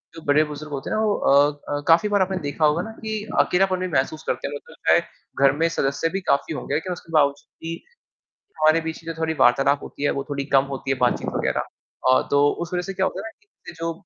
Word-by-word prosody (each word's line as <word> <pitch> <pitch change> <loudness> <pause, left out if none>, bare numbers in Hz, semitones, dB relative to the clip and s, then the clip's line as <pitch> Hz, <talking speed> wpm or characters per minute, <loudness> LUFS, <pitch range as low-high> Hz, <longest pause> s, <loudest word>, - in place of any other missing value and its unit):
जो 165 - -9
बड़े-बुज़ुर्ग 150 0 +1
होते 135 - -4
हैं - - -1
ना 220 - +1
वो 210 -2 +2
अ 140 +1 +4 0.2
अ, 145 0 -2
काफ़ी 170 +6 +5
बार 205 -1 +2
आपने 190 0 0
देखा 155 +2 +1
होगा 150 +3 +2
ना 220 - -7
कि 220 -1 -4 0.2
अकेलापन 185 0 +2
भी 185 - -2
महसूस 155 +4 -1
करते - - -1
हैं। - - -6
मेरे 145 - -5
को - - -14
लगता - - +1
है, - - +5 0.4
घर 135 0 +6
में 165 - +4
सदस्य 155 0 -1
भी 195 - -1
काफ़ी 140 +3 0
होंगे 145 - -5
लेकिन 180 +3 -2
उसके 165 -1 -12
बावजूद 145 -2 +2 0.2
भी 165 0 -3 0.9
हमारे 155 +1 +5
बीच 160 0 -5
कि 165 - -20
जो 165 - -4
थोड़ी 160 0 -1
वार्तालाप 135 +3 +4
होती - - -9
है, 145 - +3
वो 140 - -3
थोड़ी 140 -1 -2
कम 135 - +5
होती 135 0 -5
है, 135 - +2
बातचीत 125 -1 +1
वगैरह। - - 0 0.5
अ, 130 - +5
तो 145 0 +4
उस 175 +1 -5
वzह 180 - 0
से 195 - -5
क्या 190 0 +1
होता 190 - -3
है 220 - -6
ना - - -11 0.4
कि, - - -7
जो 165 0 -3
160 Hz, 255 wpm, -23 LUFS, 140-180 Hz, 0.9 s, घर